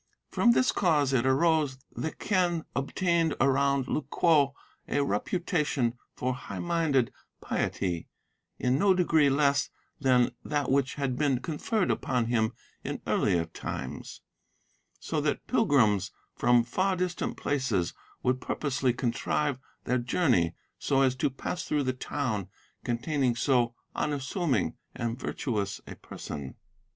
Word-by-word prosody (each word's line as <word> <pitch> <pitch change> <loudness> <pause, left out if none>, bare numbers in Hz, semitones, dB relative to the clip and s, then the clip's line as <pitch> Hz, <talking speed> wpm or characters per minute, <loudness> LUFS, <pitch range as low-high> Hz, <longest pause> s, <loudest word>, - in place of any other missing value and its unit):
From 235 - +4
this 255 - +3
cause 150 -7 +2
it 130 0 +2
arose 150 -1 +3 0.2
the 160 - -2
Quen 175 -4 0
obtained 165 +3 +1
around 135 0 +2
Lu - - 0
kwo 145 -6 +3 0.3
a 145 - +1
reputation 145 - 0 0.2
for 130 +1 -1
high 125 - -7
minded 160 -8 +1 0.3
piety, 90 -4 -2 0.5
in 125 +2 +1
no 195 0 +5
degree 160 -5 +4
less 140 0 +2 0.3
than 125 -3 +3
that 145 -3 -1
which 135 -1 +2
had 135 -3 -2
been 140 -4 +2
conferred 175 - -1
upon 125 -3 0
him 110 -2 +1 0.3
in - - -4
earlier 85 -1 +2
times, 80 - -6 0.8
so - - -2
that - - -1
pilgrims 105 -9 +3 0.3
from 120 -1 +4
far 185 +11 0
distant 180 -1 -2
places 130 -11 0 0.3
would 125 0 +1
purposely 135 -3 0
contrive 130 +3 -1 0.2
their 125 0 +1
journey 120 - +2 0.2
so 135 -1 +2
as 130 -1 +2
to 130 - +1
pass 135 +6 -4
through 150 -1 0
the 130 -1 0
town 125 -6 -2 0.4
containing 125 +1 0
so 120 -1 +2 0.2
unassuming 140 - -1 0.2
and 120 +1 -3
virtuous 105 -10 -2
a - - -8
person. 70 -3 -7
135 Hz, 130 wpm, -29 LUFS, 120-155 Hz, 0.8 s, no